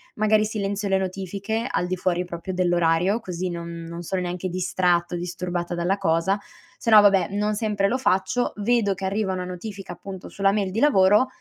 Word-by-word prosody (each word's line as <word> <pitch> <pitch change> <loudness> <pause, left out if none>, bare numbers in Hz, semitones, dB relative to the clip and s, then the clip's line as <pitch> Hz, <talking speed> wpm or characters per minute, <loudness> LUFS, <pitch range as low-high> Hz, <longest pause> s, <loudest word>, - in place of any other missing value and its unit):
magari 215 0 +3
silenzio 205 -1 -2
le 195 - +3
notifiche 195 +4 -3
al 175 - -1
di 185 - -1
fuori 180 -1 -1
proprio 175 +2 -6
dell'orario, 175 +2 +2
così 185 -4 -4
non 170 -1 -5 0.2
non 170 +1 -7
sono 185 +2 -2
neanche 180 +1 -3
distratto 180 -1 0
o - - -2
disturbata 175 0 -3
dalla 175 +3 0
cosa, 190 +2 +1 0.4
se - - -3
no 215 - +10
vabbè 200 -2 +4
non 210 +1 0
sempre 205 -2 0
lo 245 - 0
faccio, 190 0 +1
vedo 210 -1 +2
che 190 +1 -5
arriva 195 +1 -1
una 180 -1 -3
notifica, 190 +2 -7
appunto, 190 -2 -9
sulla 195 0 +1
mail 200 -2 -1
di 210 - -2
lavoro, 210 -4 +5
190 Hz, 190 wpm, -24 LUFS, 180-205 Hz, 0.4 s, no